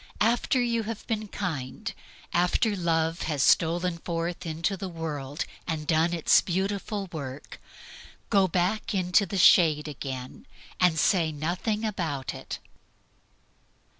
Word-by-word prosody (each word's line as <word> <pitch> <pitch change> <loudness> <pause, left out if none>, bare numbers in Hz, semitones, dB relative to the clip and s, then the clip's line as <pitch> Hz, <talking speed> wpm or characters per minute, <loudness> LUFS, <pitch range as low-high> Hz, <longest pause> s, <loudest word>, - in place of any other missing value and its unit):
After 235 +4 +2
you 235 -2 +1
have 225 -1 -6
been 215 -2 -2
kind, 155 -11 -4 0.4
after 205 +4 +2
Love 165 -2 0
has 145 -3 +1
stolen 170 +1 +3
forth 170 0 -3
into 165 +5 -1
the 190 0 -5
world 150 -3 -4 0.2
and 160 -3 -2
done 165 +2 +2
its 170 -2 +4
beautiful 195 +2 -2
work, 140 -3 -7 0.7
go 195 -3 +5
back 185 +5 0
into 185 +2 +3
the 195 - -3
shade 160 -4 +6
again 130 -3 -7 0.3
and 180 -3 +4
say 165 -1 +3
nothing 180 +8 -2
about 165 -10 -2
it. - - -6
175 Hz, 125 wpm, -27 LUFS, 155-195 Hz, 0.7 s, shade